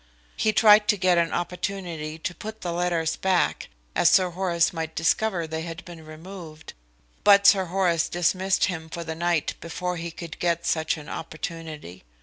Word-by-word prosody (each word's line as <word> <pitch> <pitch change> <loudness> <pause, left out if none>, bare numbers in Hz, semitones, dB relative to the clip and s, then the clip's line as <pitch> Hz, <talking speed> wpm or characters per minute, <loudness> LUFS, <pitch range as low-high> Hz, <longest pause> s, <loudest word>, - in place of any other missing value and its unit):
He 215 - +2
tried 210 -1 +6
to 210 - +3
get 180 -2 +3
an 170 -1 +1
opportunity 175 -3 -4
to 175 +2 -4
put 220 +5 -8
the 175 -1 -3
letters 170 -2 0
back 190 -2 0 0.3
as 170 - +5
Sir 185 -2 +4
Horace 175 -2 +1
might 160 -1 -4
discover 175 +2 +1
they 160 0 -4
had 165 +2 -7
been 170 -2 -11
removed, 160 0 -10 0.5
but 200 -1 +6
Sir 195 -2 +6
Horace 175 -2 +1
dismissed 185 +2 +1
him 160 -3 -5
for 170 +1 -5
the 160 -1 -4
night 170 -1 0
before 180 +2 -4
he 170 +1 -4
could 165 -1 -9
get 170 -1 0
such 160 0 0
an 150 - -10
opportunity. 155 - -7
170 Hz, 170 wpm, -25 LUFS, 160-185 Hz, 0.5 s, tried